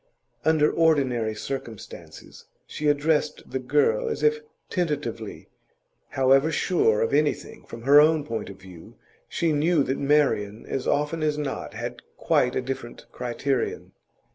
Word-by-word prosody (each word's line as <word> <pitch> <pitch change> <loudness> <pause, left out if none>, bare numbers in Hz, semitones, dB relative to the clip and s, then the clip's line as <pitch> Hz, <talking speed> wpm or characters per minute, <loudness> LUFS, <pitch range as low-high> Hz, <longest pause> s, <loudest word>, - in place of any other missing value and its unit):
Under 155 -1 +3
ordinary 130 -9 +1
circumstances 115 -2 -8 0.2
she 150 - -4
addressed 150 +1 +1
the 130 - -2
girl 150 - +1
as 445 - -4
if 455 0 +3 0.3
tentatively; 145 - -3 0.6
however 135 +4 +3
sure 135 - +2
of 115 - 0
anything 150 +1 -1
from 115 0 -10
her 145 +3 +7
own 155 0 +3
point 115 -3 -4
of 100 - -10
view, 90 -3 -14 0.3
she 165 -1 0
knew 155 +1 +2
that 135 - -2
Marian, 115 -8 +1
as 130 - -4
often 150 +3 0
as 150 -1 0
not, 145 -2 -4
had - - -6 0.2
quite 125 - +1
a - - -1
different 125 -2 -6
criterion. 125 +1 -3
140 Hz, 140 wpm, -25 LUFS, 120-155 Hz, 0.6 s, her